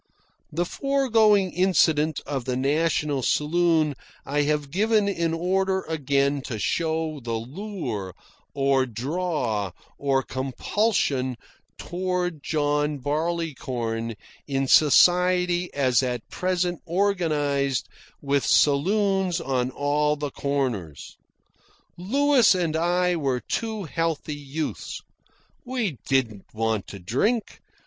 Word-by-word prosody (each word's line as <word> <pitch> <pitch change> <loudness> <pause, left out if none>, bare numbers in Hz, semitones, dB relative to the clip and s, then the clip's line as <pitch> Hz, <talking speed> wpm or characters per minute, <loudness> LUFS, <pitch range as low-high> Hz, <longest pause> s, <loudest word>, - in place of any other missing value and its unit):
The 170 +3 -1
foregoing 225 -7 +2
incident 160 -5 +2
of 135 -4 -3
the 130 -1 -1
National 145 +1 +1
Saloon 155 +2 +2 0.3
I 145 +2 0
have 145 -1 -1
given 210 +3 +2
in 170 -4 0
order 190 +3 0
again 140 -2 0
to 115 - -4
show 160 - -1
the 115 -2 -3
lure, 120 - -5 0.4
or 135 -1 +2
draw, 125 - -2 0.3
or 135 -1 +1
compulsion, 130 - -1 0.4
toward 180 -2 -2
John 150 0 0
Barleycorn 135 -7 -2 0.3
in 135 -1 -1
society 180 +4 +4
as 130 -4 +2
at 125 -4 -3
present 180 -1 -1
organised 155 - 0 0.4
with 140 -1 +1
saloons 190 +4 +2
on 130 -4 -1
all 145 +2 +1
the 145 -1 -4
corners. 125 - -3 0.8
Louis 255 +4 +3
and 170 -4 -1
I 175 +2 +2
were 135 -6 0
two 220 - -3
healthy 165 -2 -2
youths. 145 +2 -5 0.6
We 240 - -3
didn't 120 -7 0
want 110 -2 -1
to 100 - -8
drink. 135 - -1
150 Hz, 105 wpm, -25 LUFS, 135-180 Hz, 0.8 s, society